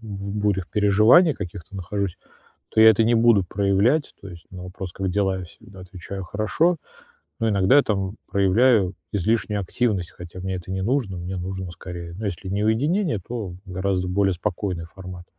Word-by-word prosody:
в 100 -2 -6
бурях 100 -4 0
переживаний 110 - +5
каких-то 95 0 -8
нахожусь, 95 0 -3 0.5
то - - +2
я 110 - +10
это 110 +1 +3
не 120 +2 +3
буду 115 -4 +5
проявлять. 100 - +1
То 100 - -8
есть 85 -2 -12
на 90 -1 -9
вопрос 90 0 -7
"как 95 +1 -2
дела?" 95 0 0
Я - - -6
всегда 95 +2 -15
отвечаю 95 +1 -8
"хорошо", 110 - +1 0.6
но 115 - +1
иногда 100 +6 +4
я 145 - +6
там 100 -1 -2
проявляю 100 0 +3 0.2
излишнюю 105 +1 0
активность, 95 -2 -1
хотя 90 +1 -10
мне 95 0 -3
это 90 0 -7
не 95 0 -2
нужно, 115 -4 0
мне 90 +2 -5
нужно, 95 0 -5
скорее, 85 -1 -8
ну, 110 - -4
если 95 -1 -4
не 100 +2 -1
уединение, 150 - +1
то 110 -7 -5
гораздо 95 0 -1
более 95 +1 +2
спокойный 90 0 -3
формат. 90 +1 -10
100 Hz, 175 wpm, -23 LUFS, 90-110 Hz, 0.6 s, я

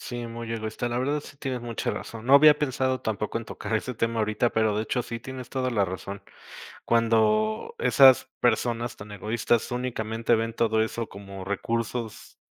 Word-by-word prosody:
Sí, 120 -1 -5
muy 115 0 -6
egoísta, 110 +2 -3
la 120 0 -2
verdad, 145 +4 0
sí 145 - -13
tienes 130 -3 -4
mucha 120 -1 -3
razón. 115 0 -7
No 135 - +6
había 150 +1 +8
pensado 130 -2 0
tampoco 110 0 -2
en 115 - -8
tocar 110 - -5
ese 125 +3 -4
tema 115 +1 -1
ahorita, 110 +2 +1
pero 110 -2 +1
de 105 - 0
hecho 120 +3 -1
sí 115 0 -6
tienes 130 0 -8
toda 130 -1 -1
la 105 -5 +2
razón. 95 +2 -6 0.6
Cuando 110 -2 +2
esas 130 +1 +6
personas 120 0 0
tan 105 +1 -10
egoístas 110 +3 0
únicamente 115 -2 -1
ven 115 0 -1
todo 110 -1 +2
eso 115 +1 -3
como 100 -1 -9
recursos 115 +3 -3
115 Hz, 175 wpm, -26 LUFS, 110-125 Hz, 0.6 s, había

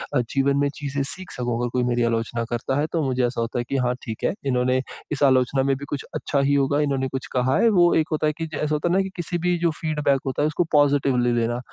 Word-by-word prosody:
अ, - - +4
जीवन 135 +3 +1
में 140 0 +2
चीज़ें 140 -1 -3
सीख 185 +6 -1
सकूँ 120 -1 -2
अगर 120 0 -1
कोई 125 -1 +1
मेरी 120 -1 +1
आलोचना 115 0 -1
करता 130 +4 -1
है 150 - +1
तो 165 - 0
मुझे 130 -1 +1
ऐसा 120 -1 -3
होता 115 +1 -2
है - - -1
कि 140 - 0
हाँ, 125 0 +1
ठीक 110 -2 -7
है - - +1
इन्होंने 130 0 +1 0.3
इस 145 0 -1
आलोचना 130 0 +3
में 135 0 +1
भी 140 - -8
कुछ 140 - -3
अच्छा 140 - -1
ही 140 +1 +2
होगा। 140 +1 +2
इन्होंने 135 -2 0
कुछ 130 0 -5
कहा 130 +1 +2
है 230 - +5
वो 175 -4 +4
एक 160 -1 +2
होता 155 0 +1
है 150 - +1
कि, 160 - -2
ऐसा 150 +1 0
होता 150 +3 -1
है 175 - +1
ना 195 - +4
कि 190 - -3
किसी 175 0 -3
भी 175 +1 0
जो 170 -1 +2
फीडबैक 150 -4 +1
होता 135 +1 -2
है 150 - +3
उसको 155 +3 0
पॉज़िटिव 145 -3 +3
ले 120 0 +2
लेना, 120 +1 -1
135 Hz, 275 wpm, -23 LUFS, 125-150 Hz, 0.3 s, है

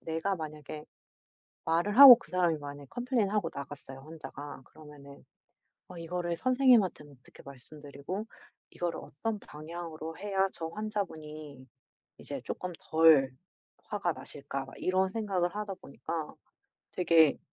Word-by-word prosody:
내가 165 +5 -1
만약에 155 -1 -7 0.8
말을 175 +7 +1
하고 270 -4 +14
그 - - -17
사람이 175 -3 +2
만약에 145 -1 -9
컴플레인하고 215 -7 0
나갔어요 140 -1 -8
환자가. 145 -2 -9
그러면은 145 -2 -14 0.7
어 180 -2 -10
'이거를 170 0 -3
선생님한테는 245 - +3
어떻게 - - -17
말씀드리고 145 - -7 0.4
이거를 175 -1 -3
어떤 220 +7 -4
방향으로 160 +1 -8
해야 195 -1 +1
저 165 - -5
환자분이 155 -9 -6 0.5
이제 - - -6
쪼끔 180 -1 -5
덜 160 -5 +5 0.5
화가 195 -5 -1
나실까.' 140 -2 -6
막 135 - -12
이런 185 +1 +1
생각을 190 -3 -1
하다 210 -2 -3
보니까 160 -1 -6 0.6
되게 165 -4 +4
165 Hz, 310 characters per minute, -30 LUFS, 150-195 Hz, 0.8 s, 하고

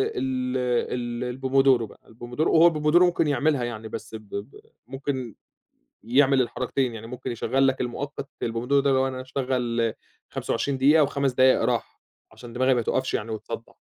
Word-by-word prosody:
ال 125 -1 -1
ال 130 - -11
الpomodoro 135 -2 +3
بقى، 105 - -11
الPomodoro 120 +7 -3
هو 165 +1 +6
الPomodoro 150 +3 +3
ممكن 175 -3 +3
يعملها 145 -1 +1
يعني، 110 -2 -5
بس 110 +1 -7
ب - - -6
ب 100 +7 -7 0.3
ممكن 130 -3 -4 0.7
يعمل 135 +3 +4
الحركتين، 125 +1 -1
يعني 115 0 -8
ممكن 125 +1 -6
يشغّل 130 +4 +1
لك 135 0 0
المؤقت، 135 +3 -4
البومودورو 120 +5 +1
ده، 140 - +1
لو 130 0 +2
أنا 130 -1 -5
هاشغّل 125 -3 -1 0.4
25 140 -2 -2
دقيقة 150 +4 +5
و5 140 -2 0
دقايق 130 +1 +4
راحة، - - -2 0.3
عشان 120 -1 -12
دماغي 130 +1 +2
ما 120 - +1
تقفش 130 +3 -1
يعني 110 +2 -2
وتصدّع. 110 - -7
130 Hz, 160 wpm, -25 LUFS, 120-135 Hz, 0.7 s, هو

